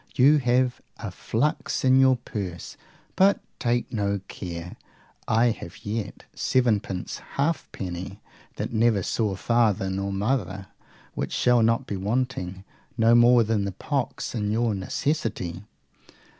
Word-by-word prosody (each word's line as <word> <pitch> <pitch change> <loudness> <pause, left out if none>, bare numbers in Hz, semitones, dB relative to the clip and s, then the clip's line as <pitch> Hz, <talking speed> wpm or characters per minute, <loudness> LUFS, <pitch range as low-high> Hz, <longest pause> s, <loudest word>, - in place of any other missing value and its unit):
You 140 +4 +6
have 125 0 +1 0.2
a 105 -5 -6
flux 125 +10 -1
in 130 0 +6
your 130 -1 +6
purse; 100 -8 -6 0.4
but 195 +1 +4 0.2
take 120 0 0
no 100 -2 0
care. 85 -2 -7 0.5
I 115 +2 +4
have 85 -6 -9
yet 105 0 -4
sevenpence 105 -7 0 0.2
halfpenny 95 - -3 0.4
that - - -4
never 110 -3 +3
saw 105 -1 0
father 105 -2 +1
nor 100 +1 -2
mother, 100 -2 -1 0.5
which - - -3
shall 125 -1 +4
not 115 +1 +2
be 100 - -4
wanting, 100 -3 -2 0.3
no 115 0 +5
more 120 0 +6
than 110 -2 0
the 100 -1 -3
pox, 135 +4 -3
in 105 -3 -1
your 115 0 +1
necessity. 100 - -2
110 Hz, 130 wpm, -25 LUFS, 95-125 Hz, 0.5 s, You